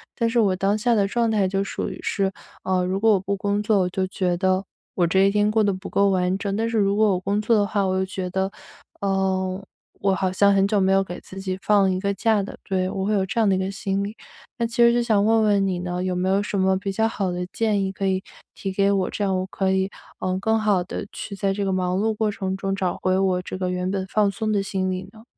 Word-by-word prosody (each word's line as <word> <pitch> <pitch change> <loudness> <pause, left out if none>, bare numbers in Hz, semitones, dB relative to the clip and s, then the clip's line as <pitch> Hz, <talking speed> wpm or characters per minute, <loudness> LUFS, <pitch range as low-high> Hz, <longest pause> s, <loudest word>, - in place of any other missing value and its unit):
但 230 -2 +1
是 235 0 +1
我 195 -4 +3
当 195 +3 +1
下 235 +2 +2
的 205 -3 +3
状 230 +2 +1
态 205 -3 +2
就 195 +1 0
属 - - -3
于 - - -8
是， 195 -1 0 0.3
呃， 185 -1 +1
如 185 +1 -1
果 225 +2 +4
我 195 - +3
不 200 +2 -2
工 200 +1 -1
作， 210 -1 +3
我 180 -1 +1
就 190 +1 -1
觉 180 -2 -1
得 185 +1 +1 0.3
我 175 -2 +2
这 190 +3 +3
一 200 - +2
天 210 0 +2
过 215 0 +2
得 200 -2 +2
不 190 +2 -7
够 200 0 +3
完 185 0 +1
整。 200 -1 -3
但 225 +1 0
是 230 - -1
如 200 -1 +2
果 215 0 +4
我 180 - 0
工 200 +3 -1
作 225 +2 +2
的 205 - +3
话， 205 -1 0
我 185 - 0
又 190 - +1
觉 185 -1 -4
得， 190 +1 -1 0.5
呃， 190 -1 0 0.4
我 195 -1 +2
好 190 -1 0
像 200 +1 +4
很 195 0 +3
久 205 -1 +1
没 190 0 +3
有 195 0 +4
给 175 -1 -7
自 190 - -10
己 185 -1 -3
放 200 -2 +3
一 185 - -1
个 200 +1 -1
假 220 0 +2
的， - - -8
对， 185 -1 -1
我 190 0 -3
会 215 - +1
有 195 -2 +2
这 225 +5 -2
样 220 - +4
的 190 - +3
一 - - 0
个 190 - -1
心 195 0 -2
理。 205 +2 -5 0.4
那 235 - 0
其 230 - -9
实 235 0 +6
就 240 - +2
想 215 -4 +2
问 225 0 +4
问 200 -2 +3
你 185 -2 -1
呢 180 0 -3
有 185 -1 -1
没 180 +1 -1
有 195 +1 +2
什 205 - -3
么 190 0 +3
比 195 +1 -3
较 220 +3 +1
好 195 -5 -2
的 180 0 -3
建 215 -3 +1
议 190 - -2
可 195 +1 -4
以 190 0 0 0.3
提 195 - -4
给 200 +1 +2
我， 195 -2 +1
这 205 - -3
样 190 -1 +1
我 185 - -2
可 190 0 -1
以， 190 0 +1 0.3
嗯， 185 0 -1
更 220 +2 +1
好 205 -4 +2
地 195 +2 -6
去 200 - -7
在 195 0 0
这 200 +1 -2
个 190 - 0
忙 185 -1 0
碌 220 +2 +1
过 215 0 0
程 190 -1 -3
中 195 0 -2
找 185 -2 -1
回 185 0 +2
我 190 -1 +1
这 185 - -6
个 185 -1 -2
原 180 0 -2
本 195 -1 -2
放 210 0 +2
松 215 +1 -2
的 205 - +2
心 190 -1 -2
理 185 0 -3
呢？ 220 +1 -16
195 Hz, 305 characters per minute, -23 LUFS, 185-205 Hz, 0.5 s, 实